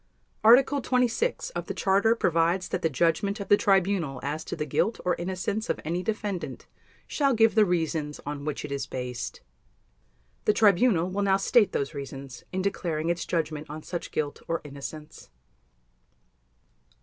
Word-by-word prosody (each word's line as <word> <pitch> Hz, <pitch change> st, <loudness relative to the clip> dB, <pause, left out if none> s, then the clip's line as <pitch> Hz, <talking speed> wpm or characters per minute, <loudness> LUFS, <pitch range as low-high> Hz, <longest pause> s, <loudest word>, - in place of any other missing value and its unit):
Article 265 Hz, +5 st, +6 dB
26 250 Hz, -, 0 dB
of -, -, -5 dB
the -, -, -4 dB
Charter 200 Hz, +4 st, +3 dB
provides 175 Hz, -2 st, +1 dB
that -, -, -2 dB
the 165 Hz, -, +2 dB
Judgment 170 Hz, -, +1 dB
of 200 Hz, -, -6 dB
the -, -, +8 dB
Tribunal 190 Hz, -, +1 dB
as 150 Hz, +3 st, -3 dB
to -, -, -5 dB
the 150 Hz, -2 st, -3 dB
guilt 200 Hz, -, 0 dB
or 180 Hz, -, +3 dB
innocence 190 Hz, +5 st, -3 dB
of -, -, 0 dB
any 170 Hz, +3 st, -1 dB
Defendant 205 Hz, -2 st, -4 dB, 0.4 s
shall 275 Hz, -4 st, +1 dB
give 225 Hz, 0 st, +4 dB
the 215 Hz, -1 st, +5 dB
reasons 160 Hz, -4 st, -1 dB
on 145 Hz, 0 st, -5 dB
which 150 Hz, -1 st, -3 dB
it 150 Hz, -, -8 dB
is 140 Hz, -1 st, -3 dB
based. 125 Hz, -1 st, -5 dB, 1.0 s
The 210 Hz, -, +4 dB
Tribunal 205 Hz, -3 st, +4 dB
will 200 Hz, +2 st, -1 dB
now 195 Hz, -1 st, +3 dB
state 210 Hz, +1 st, +3 dB
those 140 Hz, -, -2 dB
reasons 135 Hz, -2 st, -8 dB
in 185 Hz, 0 st, -2 dB
declaring 170 Hz, -5 st, -1 dB
its 175 Hz, 0 st, -3 dB
Judgment 155 Hz, -3 st, -2 dB
on 155 Hz, +1 st, -7 dB
such 175 Hz, -, -5 dB
guilt 145 Hz, -2 st, -3 dB
or 165 Hz, -, 0 dB
innocence. 150 Hz, +2 st, -9 dB
175 Hz, 160 wpm, -27 LUFS, 150-205 Hz, 1.0 s, the